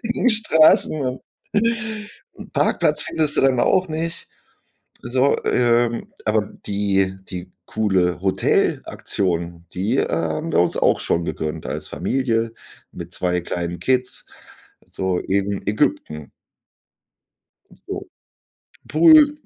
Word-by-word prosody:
engen 235 Hz, +2 st, +1 dB
Straßen 160 Hz, -7 st, +4 dB
und 130 Hz, -1 st, -3 dB, 0.3 s
'n 220 Hz, -1 st, -3 dB
Parkplatz -, -, +2 dB
findest 155 Hz, -2 st, -1 dB
du -, -, +4 dB
dann 130 Hz, -2 st, +3 dB
auch 185 Hz, -1 st, +2 dB
nicht. 165 Hz, +2 st, -4 dB, 0.7 s
So, 130 Hz, +3 st, +2 dB
ähm, 120 Hz, -1 st, +1 dB
aber 105 Hz, -1 st, 0 dB
die 95 Hz, -2 st, 0 dB
die 90 Hz, -1 st, -7 dB
coole 95 Hz, -5 st, 0 dB
Hotelaktion, 85 Hz, -2 st, -1 dB
die, 105 Hz, +8 st, -1 dB
äh, -, -, +1 dB
haben 165 Hz, 0 st, -2 dB
wir -, -, +3 dB
uns 90 Hz, 0 st, +2 dB
auch -, -, +2 dB
schon 85 Hz, 0 st, 0 dB
gegönnt 80 Hz, -1 st, -4 dB
als -, -, -4 dB
Familie 115 Hz, -4 st, -1 dB, 0.4 s
mit 85 Hz, 0 st, -9 dB
zwei 90 Hz, -1 st, 0 dB
kleinen 85 Hz, 0 st, -4 dB
Kids, 125 Hz, -1 st, 0 dB, 0.6 s
so 95 Hz, -1 st, -2 dB
in 100 Hz, +1 st, -2 dB
Ägypten. 75 Hz, -7 st, -1 dB, 1.4 s
Und -, -, -20 dB
so -, -, -4 dB
'n -, -, -18 dB, 0.6 s
Pool. 295 Hz, -, +5 dB
115 Hz, 115 wpm, -21 LUFS, -, 1.4 s, Pool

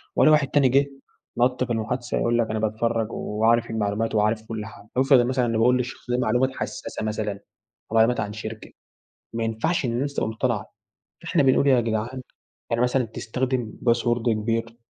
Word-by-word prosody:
والاقي 155 Hz, -, +5 dB
واحد 150 Hz, -2 st, +3 dB
تاني 135 Hz, -1 st, +3 dB
جه، 140 Hz, +3 st, +4 dB, 0.5 s
نط 125 Hz, +1 st, +2 dB
في 120 Hz, -2 st, -2 dB
المحادثة 120 Hz, +2 st, -2 dB
يقول 120 Hz, 0 st, +1 dB
لك 115 Hz, -2 st, +1 dB
أنا 110 Hz, 0 st, -1 dB
باتفرج 110 Hz, +1 st, -1 dB
وعارف 115 Hz, +2 st, +1 dB
المعلومات 110 Hz, 0 st, -1 dB
وعارف 105 Hz, +1 st, +2 dB
كُلّ 110 Hz, -2 st, -5 dB
حاجة، 105 Hz, -1 st, -13 dB
وافرض 135 Hz, +1 st, +5 dB
إن 120 Hz, -, +2 dB
مثلًا 130 Hz, -1 st, +1 dB
إني 115 Hz, -1 st, 0 dB
باقول 125 Hz, +3 st, +4 dB
للشخص 125 Hz, 0 st, -5 dB
ده 125 Hz, -, +2 dB
معلومات 125 Hz, +2 st, +2 dB
حساسة -, -, -5 dB
مثلًا، 105 Hz, -2 st, -3 dB, 0.5 s
معلومات 115 Hz, +2 st, +4 dB
عن 105 Hz, -, -3 dB
شركة، 110 Hz, +1 st, -7 dB, 0.6 s
ما 115 Hz, 0 st, -2 dB
ينفعش 115 Hz, +10 st, -1 dB
إن 120 Hz, -, 0 dB
الناس 140 Hz, +4 st, -2 dB
تبقى -, -, 0 dB
متطلعة، 110 Hz, -1 st, -2 dB, 0.5 s
فإحنا 165 Hz, -2 st, +2 dB
بنقول 135 Hz, +1 st, +4 dB
يا 130 Hz, -3 st, +5 dB
جدعان 115 Hz, +3 st, -2 dB, 0.5 s
يعني 115 Hz, 0 st, 0 dB
مثلًا 125 Hz, 0 st, +1 dB
تستخدم 125 Hz, +1 st, -3 dB
باسورد 120 Hz, 0 st, +1 dB
كبير، 115 Hz, +1 st, -1 dB
115 Hz, 175 wpm, -24 LUFS, 110-125 Hz, 0.6 s, والاقي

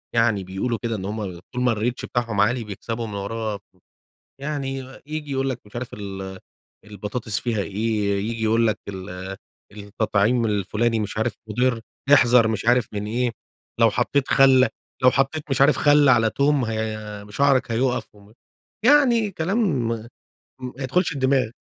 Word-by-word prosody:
يعني 115 Hz, -4 st, +2 dB
بيقولوا 95 Hz, +6 st, -2 dB
كده، 115 Hz, -1 st, -2 dB
إن 95 Hz, -3 st, -5 dB
هُم 100 Hz, -4 st, -4 dB
طول 125 Hz, -, -2 dB
ما 125 Hz, -1 st, +3 dB
الReach 120 Hz, +3 st, -2 dB
بتاعهم 115 Hz, -4 st, -1 dB
عالي 120 Hz, +3 st, +2 dB
بيكسبوا 115 Hz, +3 st, -5 dB
من 105 Hz, -, -7 dB
وراه، 105 Hz, +1 st, -3 dB, 0.8 s
يعني 140 Hz, -2 st, -3 dB, 0.3 s
ييجي 150 Hz, -1 st, -5 dB
يقول 135 Hz, 0 st, 0 dB
لك 125 Hz, -2 st, -5 dB
مش 105 Hz, -, -11 dB
عارف 120 Hz, 0 st, -5 dB
ال 95 Hz, -2 st, -7 dB, 0.5 s
البطاطس 105 Hz, +1 st, -2 dB
فيها 115 Hz, -4 st, -1 dB
إيه، 105 Hz, 0 st, -1 dB
ييجي 115 Hz, -1 st, -3 dB
يقول 115 Hz, +1 st, +3 dB
لك 110 Hz, -, 0 dB
ال 95 Hz, 0 st, -7 dB, 0.3 s
التَّطعيم 105 Hz, +3 st, 0 dB
الفُلاني 110 Hz, +2 st, 0 dB
مش 105 Hz, 0 st, -4 dB
عارف 110 Hz, 0 st, 0 dB, 0.2 s
مُضرّ، 125 Hz, +2 st, +1 dB, 0.3 s
احذر 120 Hz, -4 st, +6 dB
مش 110 Hz, 0 st, -2 dB
عارف 120 Hz, -1 st, +3 dB
من 105 Hz, 0 st, -3 dB
إيه، 120 Hz, +2 st, 0 dB, 0.5 s
لو 115 Hz, -1 st, +6 dB
حَطَّيت 135 Hz, +6 st, 0 dB
خَلّ 130 Hz, -1 st, +6 dB, 0.4 s
لو 125 Hz, -, +7 dB
حَطَّيت 135 Hz, +4 st, 0 dB
مش 135 Hz, 0 st, +1 dB
عارف 145 Hz, +2 st, +5 dB
خَلَّ 145 Hz, -1 st, +5 dB
على 115 Hz, -3 st, +4 dB
تُوم 140 Hz, +1 st, +1 dB
ه 110 Hz, -2 st, -4 dB
شعرك 135 Hz, +2 st, +2 dB
هيوقَّف 125 Hz, +2 st, 0 dB
وم 105 Hz, +1 st, -19 dB, 0.5 s
يعني 245 Hz, -6 st, +5 dB
كلام 175 Hz, -, 0 dB
ما 115 Hz, 0 st, -4 dB, 0.5 s
ما 125 Hz, -1 st, -6 dB
يدخُلش 165 Hz, +6 st, +1 dB
الدِّمَاغ. 130 Hz, -4 st, +1 dB
115 Hz, 160 wpm, -23 LUFS, 105-130 Hz, 0.8 s, لو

